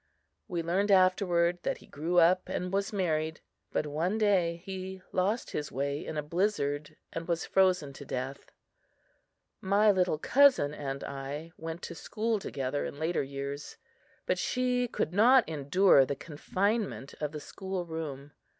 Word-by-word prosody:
We 170 -2 -2
learned 190 +5 +1
afterward 185 -2 +3
that - - -1
he - - -16
grew 165 +5 -2
up 175 +2 +5
and 180 +1 -3
was 200 0 0
married; 160 -5 -1 0.3
but - - 0
one 165 +8 -1
day 180 -6 +2
he 190 -1 -6
lost 200 +6 0
his 150 0 -3
way 140 +2 -2
in 155 - -5
a 150 - -1
blizzard 155 -4 -1 0.2
and 165 0 -5
was 170 -1 -1
frozen 180 -7 +2
to 140 - -10
death. 135 +1 -5 1.1
My 205 +2 +4
little 180 -5 +1
cousin 255 - +4
and 140 -2 -5
I 140 +4 -6
went 165 +1 -6
to - - -5
school 220 +5 -2
together 140 -6 -3
in - - -5
later 160 +3 0
years; 140 +1 -6 0.5
but 180 - 0
she 250 +1 +1
could 175 - -2
not 240 +5 +6
endure 155 +1 +4
the 140 +2 -2
confinement 185 - -2
of 150 -1 -1
the 150 - -6
school 190 +3 -5
room. 150 -4 -6
170 Hz, 155 wpm, -30 LUFS, 145-190 Hz, 1.1 s, not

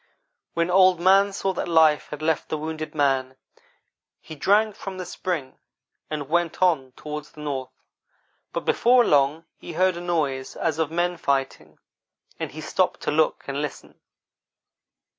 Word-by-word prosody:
When 170 +1 +1
Old 185 -1 +5
man 195 +3 +5
saw 195 0 -2
that 175 - -3
life 160 -3 +4
had 150 0 -7
left 160 0 0
the 155 - -1
wounded 155 0 -5
man, 135 -3 +1 0.8
he 160 - -11
drank 205 +7 +2
from 190 -1 -7
the 185 - -5
spring, 160 -7 -4 0.5
and 150 -3 -4
went 170 +1 0
on 155 -9 +2
toward 150 +1 -6
the 150 - -14
north, 135 -3 -5 0.7
but - - -4
before 245 0 +4
long 145 +1 +2
he 170 - -9
heard 185 +2 +2
a - - -6
noise 150 -7 -2
as 160 -2 -1
of 160 -3 +1
men 175 +2 -1
fighting, 135 -3 -2 0.6
and - - -3
he - - -8
stopped - - 0
to - - -1
look 155 +1 +1
and 140 +1 -2
listen. 150 -2 -7
160 Hz, 160 wpm, -24 LUFS, 145-180 Hz, 0.8 s, Old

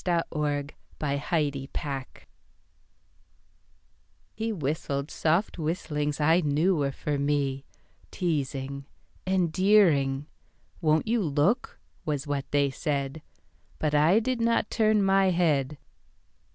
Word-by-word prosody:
In 175 -2 +1
the 165 - +1 0.7
Park 140 -2 -2
Helen 145 -5 0
Hoyt 135 -3 -5 2.1
HE 225 +1 -2
whistled 145 -3 -3
soft 170 +5 0
whistlings 150 -2 -2
I 160 +3 +4
knew 155 +5 +2
were 140 -3 0
for 145 +1 -3
me, 140 -1 0 0.4
Teasing, 140 -4 -3 0.4
endearing. 175 -6 +3 0.6
Won't 155 +3 +2
you 230 0 +2
look? 155 - 0 0.2
was 150 -2 -2
what 145 -1 -3
they 140 -1 +2
said, 140 +1 -3 0.6
But 150 -1 -1
I 155 +8 +5
did 245 +1 -2
not 230 -2 +1
turn 215 -2 +3
my 195 0 +4
head. 150 -5 +1
150 Hz, 110 wpm, -27 LUFS, 140-180 Hz, 2.1 s, I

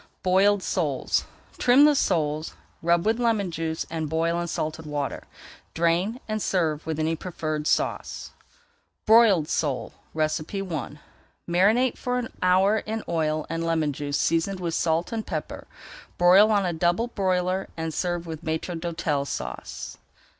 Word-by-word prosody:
BOILED 190 +2 +3
SOLES 150 -8 0 0.3
Trim 255 +4 +6
the 300 - +6
soles, 155 - 0 0.3
rub 170 +1 +2
with 225 +2 +2
lemon 220 -6 +1
juice 160 -1 -3
and 160 -2 -3
boil 165 +2 0
in 170 - -3
salted 155 -1 -4
water. 145 -2 -3 0.5
Drain, 170 +8 +1
and 215 -1 -2
serve 160 -6 0
with 160 -2 -2
any 160 +1 +1
preferred 155 -3 -4
sauce. - - -1 0.7
BROILED 215 -8 +6
SOLE 145 -6 -2 0.2
I 155 - -2 0.5
Marinate 210 +9 +3
for 250 0 -1
an 245 -2 -4
hour 190 +4 +4
in 220 +1 -4
oil 155 -2 0
and 165 +1 -3
lemon 160 -3 0
juice 145 +1 -2
seasoned 165 +4 0
with 170 -2 -3
salt 165 +1 0
and 225 -1 -2
pepper. - - -5 0.5
Broil 185 +4 +6
on 205 -3 +2
a 175 - -1
double 175 +7 +1
broiler 185 -2 0
and 160 -1 -3
serve 175 0 -2
with 160 -2 -7
Maître 160 +2 -3
d'Hôtel 160 -4 -2
Sauce. - - -6
170 Hz, 145 wpm, -25 LUFS, 160-195 Hz, 0.7 s, Trim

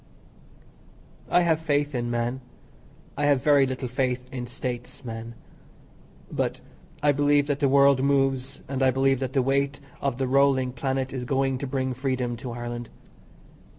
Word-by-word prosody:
I 175 - +4
have 165 -2 +2
faith 145 -2 0
in 120 -2 -2
man, 120 +2 -1 0.7
I 145 0 +1
have 140 -3 +3
very 145 -2 +5
little 130 0 -3
faith 125 0 -1
in 125 -2 -4
States 125 +1 -6
man. 115 0 -6 1.0
But - - -1 0.4
I 145 - +5
believe 145 0 +3
that 145 -1 -1
the 140 -2 +3
world 140 -1 +5
moves, 135 -1 +1
and 135 -1 -3
I 130 - +5
believe 135 0 +2
that 130 -1 -3
the 135 - +2
weight 140 +1 0 0.2
of 135 -3 -1
the 135 - 0
rolling 130 -1 +3
planet 130 +1 -2
is 130 -2 -3
going 135 0 0
to 140 - -4
bring 130 -1 -1
freedom 130 -2 -2
to 120 +1 -6
Ireland. 120 0 -5
130 Hz, 160 wpm, -26 LUFS, 125-140 Hz, 1.0 s, very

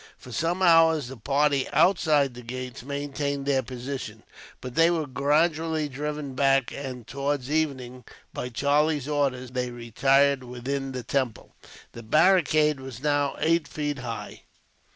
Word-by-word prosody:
For 125 - -13
some 170 +9 -1
hours, 165 -5 +5
the 135 - -8
party 140 +3 +1
outside 155 -4 +3
the 125 - -10
gates 125 +1 -7
maintained 140 0 -3
their 135 -2 +2
position, 130 +1 -7 0.4
but 125 -1 -8
they 165 +3 +5
were 165 -3 0
gradually 155 +3 +1
driven 145 0 -5
back; 135 -1 +2
and 130 -4 -7
towards 140 +1 -3
evening, 130 -6 -2 0.3
by 125 - -4
Charlie's 145 +3 +1
orders, 135 -4 -1
they 125 -1 -2
retired 135 +4 +2
within 135 +2 -4
the 125 -1 -5
temple. 130 -4 -2 0.4
The 115 - -10
barricade 155 - +3
was 130 -1 -9
now 145 -1 +1
eight 165 0 +1
feet 145 -2 -3
high. 115 -3 -6
140 Hz, 140 wpm, -26 LUFS, 130-150 Hz, 0.4 s, hours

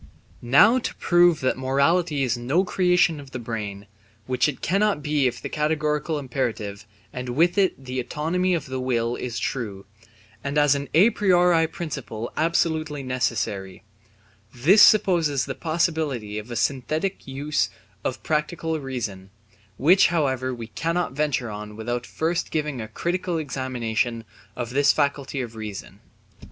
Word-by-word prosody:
Now 170 - +5
to - - -4
prove 175 -2 +4
that 130 0 0
morality 140 +3 +2
is 125 -1 +1
no 130 +10 +1
creation 180 -4 +2
of 140 -1 -11
the 130 - -6
brain, 105 -4 -5 0.4
which 125 +2 +1
it 135 - -6
cannot 195 -4 +1
be 150 -3 +2
if 120 -1 -3
the - - -5
categorical 150 0 -1
imperative 110 -6 -3 0.3
and 125 0 -5
with 170 +4 +3
it 185 -10 +1
the 130 0 -3
autonomy 165 +8 0
of 165 - -3
the 130 0 -4
will 120 -2 0
is 120 -2 -5
true, 105 -7 -4 0.6
and 140 +1 -2
as 145 -1 +5
an 140 0 -3
a 200 +8 +6
priori 180 -5 +3
principle 135 -9 -6
absolutely 155 -3 0
necessary, 110 -7 -2 0.7
this 160 - +5
supposes 165 -9 +5
the 135 - -4
possibility 155 - -1
of 105 +3 -10
a 120 - -5
synthetic 155 +10 -1
use 145 +3 -1 0.3
of 130 - -3
pure - - -15
practical 160 +1 -1
reason, 115 -9 -5 0.5
which 175 +8 +5
however 130 -6 0
we 120 -2 -6
cannot 165 - -2
venture 135 -5 -1
on 105 0 -7
without 120 +2 -3
first 170 +2 -1
giving 150 -5 -2
a 110 - -6
critical 175 +8 -2
examination 125 -5 -2 0.3
of 120 -1 -4
this 140 +2 +4
faculty 140 -2 -1
of 115 -2 -7
reason. 105 -3 -7
140 Hz, 150 wpm, -24 LUFS, 120-160 Hz, 0.7 s, a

